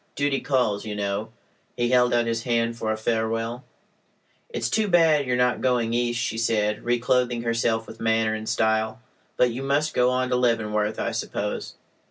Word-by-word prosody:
Duty 145 -1 0
calls, 125 -7 0
you 105 -2 -5
know." 100 +1 -2 0.5
He 120 0 0
held 125 -1 +4
out 120 -1 +2
his 115 0 -1
hand 115 -1 0
for 110 -1 -2
a 110 - -1
farewell. 115 +2 -2 0.9
"It's 470 - -2
too 220 -1 +1
bad 160 -6 +4
you 125 - 0
are - - +1
not 125 0 +1
going 120 -3 +1
East," 120 0 0
she 115 -1 -2
said, 105 -2 0
reclothing 120 0 +1
herself 115 -1 0
with - - -12
manner 110 -1 +1
and 110 0 -4
style. 110 +2 0 0.4
"But 125 -1 +3
you 120 +3 -5
must 145 +3 0
go 125 0 +3
on 125 0 0
to 125 - +1
Leavenworth, 110 -3 0
I - - -1
suppose?" - - -4
115 Hz, 185 wpm, -24 LUFS, 110-125 Hz, 0.9 s, held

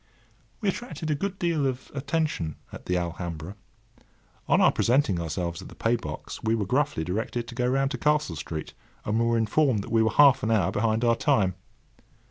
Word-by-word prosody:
We 205 - +1
attracted 165 -7 -4
a - - +3
good 195 +6 -3
deal 165 -6 +1
of 130 -1 -5
attention 145 - -1 0.2
at - - -10
the 90 - +1
Alhambra. 85 0 -4 0.9
On - - +4
our - - +6
presenting 115 -8 +2
ourselves 85 +2 -3
at - - -10
the - - -13
paybox 115 +1 -3
we 110 0 +2
were 105 -3 -1
gruffly 140 - 0
directed 110 +7 -3
to - - -8
go 125 0 0
round 135 +2 +1
to - - -4
Castle 150 - +1
Street, 75 +1 -6 0.3
and 110 +2 0
were 115 0 +2
informed 115 0 +2
that - - -9
we 115 -1 +4
were 110 - +3
half 140 -3 +6
an 110 - -1
hour 110 -4 +2
behind 110 +3 0
our 115 -1 +4
time. 95 -4 +2
115 Hz, 190 wpm, -26 LUFS, 95-140 Hz, 0.9 s, our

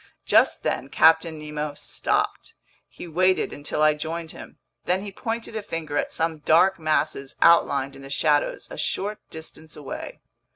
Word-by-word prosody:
Just - - +3
then 135 - -2
Captain 160 +1 +4
Nemo 150 -1 -5
stopped. - - -2 0.3
He - - -10
waited 185 +3 +2
until 145 +1 -2
I 155 0 +5
joined 160 +2 -5
him, - - -12 0.3
then 185 +2 0
he 205 - -6
pointed 225 +2 -5
a 220 - -2
finger 165 -6 -5
at - - 0
some 160 -1 -1
dark 170 +5 +4
masses 155 -3 -1
outlined 140 -5 +4
in 135 - -12
the 135 - -10
shadows 145 +1 +1
a - - -7
short 210 +2 -2
distance 160 -1 -10
away. 145 -3 -7
160 Hz, 160 wpm, -24 LUFS, 150-170 Hz, 0.3 s, I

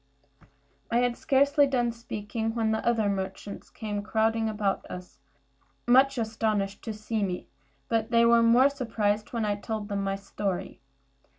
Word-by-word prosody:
I 235 - +1
had 245 -1 +1
scarcely 280 +2 +3
done 245 -3 +1
speaking, 225 -1 -4
when 225 -2 +1
the 220 - -1
other 230 -3 +2
merchants 195 0 -4
came 210 -2 -4
crowding 220 +1 +1
about 205 -2 -1
us, 180 -5 -9 0.7
much 265 +2 +5
astonished 215 -3 -1
to 225 - -3
see 215 +1 -3
me; 185 -3 -3 0.4
but 225 -1 0
they 235 0 +4
were 235 0 +6
much 230 0 +5
more 255 +4 +6
surprised 220 -6 -1
when 230 -3 -1
I 205 - +1
told 215 0 -4
them 200 -1 -1
my 195 0 -1
story. 195 -1 -4
220 Hz, 160 wpm, -27 LUFS, 205-235 Hz, 0.7 s, were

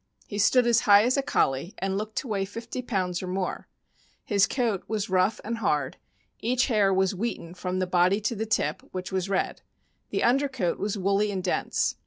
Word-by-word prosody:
He 205 - -5
stood 245 +5 +4
as 235 -1 +4
high 205 -2 +6
as 250 +2 +2
a 275 - +2
Collie, 135 - 0
and 195 0 -2
look 215 +2 -4
d - - 0
to - - -10
weigh 200 -3 -1
fifty 230 +5 -6
pounds 185 -7 -2
or 185 - -5
more; 185 0 -3 0.6
his 200 -2 +3
coat 230 -7 -1
was 210 -3 -2
rough 190 +3 +2
and 230 +1 -3
hard; 150 -10 0 0.4
each 250 +3 +1
hair 210 -4 +3
was 190 +1 +2
wheaten 195 -4 -4
from 180 0 -3
the 185 - +1
body 180 +2 +3
to 215 +3 -1
the 220 +1 -3
tip, 220 - 0
which 185 0 -5
was 190 0 -1
red; 195 - -1 0.5
the - - -1
under 275 +4 +3
coat 210 -10 -2
was 205 +1 -2
woolly 200 +2 +1
and 190 -2 -3
dense. 180 - 0
200 Hz, 210 wpm, -26 LUFS, 185-225 Hz, 0.6 s, high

